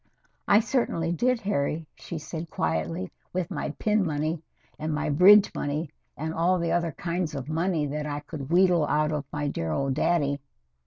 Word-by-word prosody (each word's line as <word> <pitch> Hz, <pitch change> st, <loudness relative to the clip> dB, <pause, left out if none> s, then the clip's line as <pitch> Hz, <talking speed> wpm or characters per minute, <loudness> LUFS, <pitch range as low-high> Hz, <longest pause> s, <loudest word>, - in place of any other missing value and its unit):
"I 205 Hz, +2 st, +6 dB
certainly 170 Hz, -10 st, 0 dB
did, 240 Hz, +7 st, +1 dB
Harry," 160 Hz, -5 st, -1 dB
she 170 Hz, -, -7 dB
said 160 Hz, +1 st, -6 dB
quietly. 80 Hz, -, -2 dB, 0.2 s
"With 180 Hz, -2 st, -2 dB
my -, -, -2 dB
pin 210 Hz, -1 st, +2 dB
money, 155 Hz, 0 st, -1 dB, 0.4 s
and 155 Hz, +1 st, -2 dB
my 150 Hz, 0 st, -1 dB
bridge 195 Hz, +7 st, +7 dB
money 150 Hz, +2 st, -2 dB, 0.3 s
and 160 Hz, +2 st, -3 dB
all 175 Hz, +3 st, +2 dB
the 170 Hz, -1 st, -1 dB
other 170 Hz, -2 st, 0 dB
kinds 170 Hz, -1 st, -2 dB
of 135 Hz, -1 st, -5 dB
money 165 Hz, -1 st, 0 dB
that 150 Hz, +1 st, -3 dB
I 145 Hz, 0 st, -3 dB
could 145 Hz, -3 st, -7 dB
wheedle 175 Hz, -3 st, +4 dB
out 150 Hz, 0 st, +1 dB
of 150 Hz, -2 st, -2 dB
my 150 Hz, 0 st, -2 dB
dear 80 Hz, -, -2 dB
old 135 Hz, -, 0 dB
daddy. 145 Hz, -1 st, +1 dB
155 Hz, 175 wpm, -27 LUFS, 145-175 Hz, 0.4 s, bridge